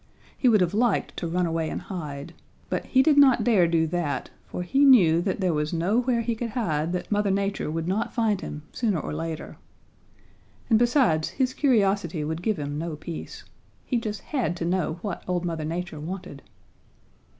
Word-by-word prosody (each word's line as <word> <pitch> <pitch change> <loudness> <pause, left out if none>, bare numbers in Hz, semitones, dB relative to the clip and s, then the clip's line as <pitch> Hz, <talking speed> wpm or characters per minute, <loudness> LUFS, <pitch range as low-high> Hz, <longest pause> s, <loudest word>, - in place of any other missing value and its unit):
He 255 - +3
would 215 -4 +4
have 180 +1 +1
liked 230 0 +1
to 170 - -2
run 180 +2 0
away 165 -1 -1
and - - -3
hide. 155 -7 -7 0.4
But - - -1
he 260 0 +4
did 295 -1 +5
not 270 -3 +6
dare 205 -8 +4
do 165 -1 +2
that, 160 -3 -2 0.2
for 180 - -4
he 270 +11 +2
knew 180 - +6
that 190 +2 -2
there 180 -3 +2
was 150 +1 -1
nowhere 230 +8 +1
he 230 +1 -1
could 230 +1 -4
hide 165 -9 -1
that 180 - -4
Mother 205 -1 +2
Nature 195 -3 -1
would 165 +1 -3
not 195 +5 -1
find 220 -5 0
him 150 - -7
sooner 210 -8 0
or - - -5
later. 160 0 -5 1.1
And 220 - +6
besides, 240 - +3
his 255 -1 -1
curiosity 200 - +1
would 160 +2 -3
give 215 +1 0
him 145 0 -4
no 165 -1 -4
peace. 160 +2 -8 0.4
He 250 - 0
just 215 -2 -4
had 245 - -2
to 170 - -3
know 175 -2 0
what 200 -5 -4
old 180 -1 -1
Mother 165 -3 -3
Nature 165 -1 -4
wanted. 160 -3 -7
180 Hz, 190 wpm, -25 LUFS, 165-225 Hz, 1.1 s, not